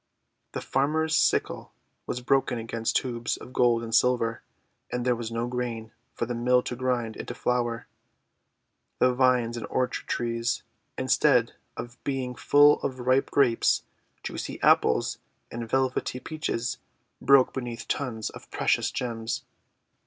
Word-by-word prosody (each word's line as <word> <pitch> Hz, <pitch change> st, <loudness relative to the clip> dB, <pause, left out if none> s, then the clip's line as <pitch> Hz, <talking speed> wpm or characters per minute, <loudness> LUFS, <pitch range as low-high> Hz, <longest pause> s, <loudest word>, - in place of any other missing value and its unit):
The -, -, -3 dB
farmer's 155 Hz, +4 st, +1 dB
sickle -, -, +1 dB, 0.3 s
was 125 Hz, -, -3 dB
broken 130 Hz, 0 st, +1 dB
against 115 Hz, 0 st, -2 dB
tubes 120 Hz, -2 st, -1 dB
of 125 Hz, -, -12 dB
gold 120 Hz, -2 st, +3 dB
and 115 Hz, -1 st, -6 dB
silver, 120 Hz, -1 st, +2 dB, 0.5 s
and 125 Hz, 0 st, -2 dB
there 125 Hz, -1 st, +3 dB
was 115 Hz, -1 st, -5 dB
no 115 Hz, +1 st, -1 dB
grain 120 Hz, -3 st, -4 dB, 0.2 s
for -, -, -1 dB
the 120 Hz, -, -3 dB
mill 125 Hz, +1 st, +2 dB
to 125 Hz, -, -4 dB
grind 120 Hz, -3 st, -1 dB
into 120 Hz, -, -6 dB
flour. 120 Hz, -2 st, -1 dB, 1.1 s
The 125 Hz, 0 st, +3 dB
vines 125 Hz, -2 st, +2 dB
and 115 Hz, -, -5 dB
orchard 130 Hz, -, -1 dB
trees, 115 Hz, 0 st, -1 dB, 0.3 s
instead 130 Hz, -2 st, +3 dB, 0.2 s
of 120 Hz, +1 st, -8 dB
being 130 Hz, -2 st, -2 dB
full 145 Hz, +3 st, +5 dB
of 130 Hz, -2 st, -3 dB
ripe 130 Hz, +2 st, +2 dB
Grapes, 125 Hz, -5 st, +3 dB, 0.4 s
juicy -, -, -5 dB
Apples, -, -, +3 dB, 0.3 s
and 115 Hz, -1 st, -5 dB
velvety 130 Hz, -1 st, 0 dB
Peaches, 130 Hz, -6 st, -3 dB, 0.4 s
broke 135 Hz, -1 st, +5 dB
beneath 120 Hz, -3 st, -5 dB
tons 115 Hz, -6 st, -2 dB
of -, -, -13 dB
precious -, -, +1 dB
gems. 115 Hz, -2 st, -3 dB
125 Hz, 140 wpm, -27 LUFS, 115-130 Hz, 1.1 s, full